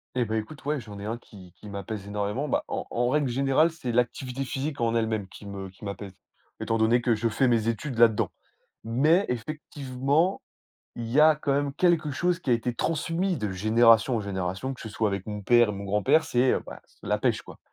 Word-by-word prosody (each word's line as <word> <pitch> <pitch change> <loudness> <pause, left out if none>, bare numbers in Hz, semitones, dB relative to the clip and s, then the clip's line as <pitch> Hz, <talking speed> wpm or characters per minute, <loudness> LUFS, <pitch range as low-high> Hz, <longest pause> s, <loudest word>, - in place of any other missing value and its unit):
Et 125 - +1
bah, 110 0 -1
écoute, 125 +8 -6
ouais, 150 -1 0
j'en 105 -3 -10
ai 100 - -6
1 115 +2 -3
qui 95 -7 -15
qui - - -11
m'apaise 100 0 -6
énormément. 105 +7 -2
Bah, - - 0
en - - -3
en 120 +1 +1
règle 145 +1 +2
générale 135 +6 +3
c'est 145 -7 -5
l'activité 125 +2 -1
physique 135 +2 -4
en 115 -1 +1
elle 115 -1 +2
même 110 -3 -2
qui 100 +2 -13
me 95 -1 -6
qui 95 +2 -18
m'apaise. 100 -1 -6 0.5
Étant 115 - 0
donné 115 +2 +3
que 120 -1 +2
je 110 +2 0
fais 115 +4 +2
mes 115 -2 +2
études 115 +3 -2
là-dedans. 115 -2 +4 0.5
Mais 150 - +3
effectivement, 140 +5 -1 0.5
il 115 -1 -5
y 140 - +4
a 155 0 +7
quand 145 -2 -1
même 140 0 0
quelque 170 -3 +2
chose 175 +5 0
qui 140 - -5
a - - +7
été 120 +1 -1
transmis 165 +5 -1
de 105 -5 -2
génération 115 +4 +4
en - - -2
génération, 95 +5 -3
que 130 - -12
ce 110 - -7
soit 110 0 0
avec 100 -1 -4
mon 105 -1 -4
père 120 +2 +4
et - - 0
mon 100 0 -6
grand-père. 105 +10 +3
C'est, 125 -4 +2
heu, - - 0
bah, - - -10
c'est, - - -31
heu, - - -5
la - - +1
pêche - - +1
quoi. - - -13
120 Hz, 230 wpm, -27 LUFS, 105-140 Hz, 0.5 s, a